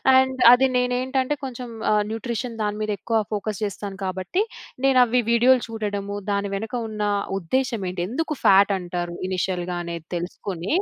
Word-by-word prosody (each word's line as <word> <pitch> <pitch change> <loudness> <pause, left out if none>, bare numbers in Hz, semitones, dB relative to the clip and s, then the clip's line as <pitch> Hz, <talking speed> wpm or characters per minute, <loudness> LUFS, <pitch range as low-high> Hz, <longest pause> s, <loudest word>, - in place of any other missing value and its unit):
And 260 0 +3
అది 265 +2 +5
నేనేంటంటే 255 +2 0
కొంచెం 250 -1 -6 0.2
ఆహ్, 210 0 +3
న్యూట్రిషన్ 230 0 -4
దాని 210 0 -1
మీద 215 - -1
ఎక్కువ 225 -1 0
ఫోకస్ 210 0 -3
చేస్తాను. 200 -1 -5
కాబట్టి, 190 - -1 0.4
నేను 265 -2 +5
అవి 245 +1 +2
వీడియోలు 245 +2 +5
చూడడము. 205 -2 -3
దాని 200 0 0
వెనక 220 +3 -5 0.2
ఉన్నా 210 -1 -1 0.3
ఉద్దేశ్యం 230 +4 -1
ఏంటి, 180 -1 -3
ఎందుకు 310 +6 -2
ఫాట్ 200 +1 +6
అంటారు, 175 -1 -4
ఇనిషియల్‌గా 180 -1 -2
అనేది 170 -1 -6
తెలుసుకొని. 175 - -4
215 Hz, 150 wpm, -23 LUFS, 190-250 Hz, 0.4 s, ఫాట్